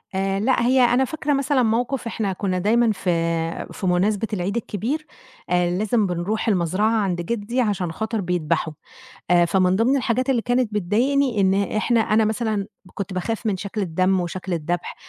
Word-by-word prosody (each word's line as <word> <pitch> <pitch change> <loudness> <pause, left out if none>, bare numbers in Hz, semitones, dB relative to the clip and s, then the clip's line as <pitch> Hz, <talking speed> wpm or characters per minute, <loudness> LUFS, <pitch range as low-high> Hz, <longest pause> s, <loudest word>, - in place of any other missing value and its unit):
آآ، 195 0 0
لأ، 240 +3 +2
هي 255 +1 +4
أنا 245 +2 +4
فاكرة 295 +1 -2
مثلًا 275 -1 +2
موقِف 240 +2 0
إحنا 205 -4 -2
كنّا 185 -1 -2
دايمًا 225 +4 +3
في 195 -3 -3 0.6
في 190 - -4
مناسبة 200 +5 +1
العيد 190 +1 -2
الكبير 235 - -3 0.4
آآ، 175 -1 +2
لازم 215 0 +1
بنرُوح 180 +6 -2
المزرَعة 190 +2 +1
عَند 180 -3 -1
جدّي 235 +6 -2
عشان 195 -6 -1
خاطر 220 +4 -3
بيدبَحوا 165 -3 -1 0.6
آآ، 175 -1 +5
فمن 185 +1 +2
ضِمن 245 +7 +3
الحاجات 255 +1 0
اللي 250 -3 +2
كانت 245 -2 0
بتضايقني 235 +5 +1
إن 190 0 +3 0.2
إحنا، 230 +2 +2
أنا 220 0 +2
مثلًا 215 -2 -1 0.3
كنت 200 -1 -5
باخاف 225 +5 -3
من 200 -3 0
شكْل 200 +2 -4
الدم 185 +2 +1
وشكْل 180 +1 -4
الدبح، 170 +2 -3
210 Hz, 165 wpm, -22 LUFS, 185-235 Hz, 0.6 s, آآ